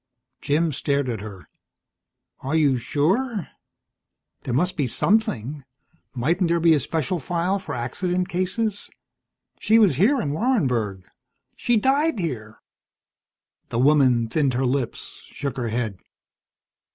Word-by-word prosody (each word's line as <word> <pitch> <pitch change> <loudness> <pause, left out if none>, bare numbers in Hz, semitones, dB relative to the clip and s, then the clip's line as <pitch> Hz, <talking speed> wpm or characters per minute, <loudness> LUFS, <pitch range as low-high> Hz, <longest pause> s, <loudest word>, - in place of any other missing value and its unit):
Jim 155 +3 +1
stared 140 -1 -1
at 115 -5 -3
her. 100 -4 -10 0.9
"Are 135 +4 -3
you 145 -4 +3
sure? 180 - 0 0.9
There 125 - -4
must 180 +7 +1
be 140 -4 0
something. 150 - 0 0.5
Mightn't 170 +9 +1
there 170 0 +2
be 165 0 +5
a 150 - +3
special 160 +5 -2
file 175 +6 -1
for 155 -7 -6
accident 180 +9 -2
cases? 200 +4 -2 0.7
She 220 - +4
was 200 - +4
here 245 - +4
in 145 -11 -2
Warrenburg. 125 - 0 0.5
She 240 -1 +1
died 280 +6 +2
here." 120 - -5 1.1
The - - -3
woman 130 -3 +4
thinned 135 +1 0
her 130 +2 +1
lips, 130 -1 -3
shook 140 -2 -5
her 120 -2 -2
head. 110 -4 -3
150 Hz, 125 wpm, -23 LUFS, 125-185 Hz, 1.1 s, be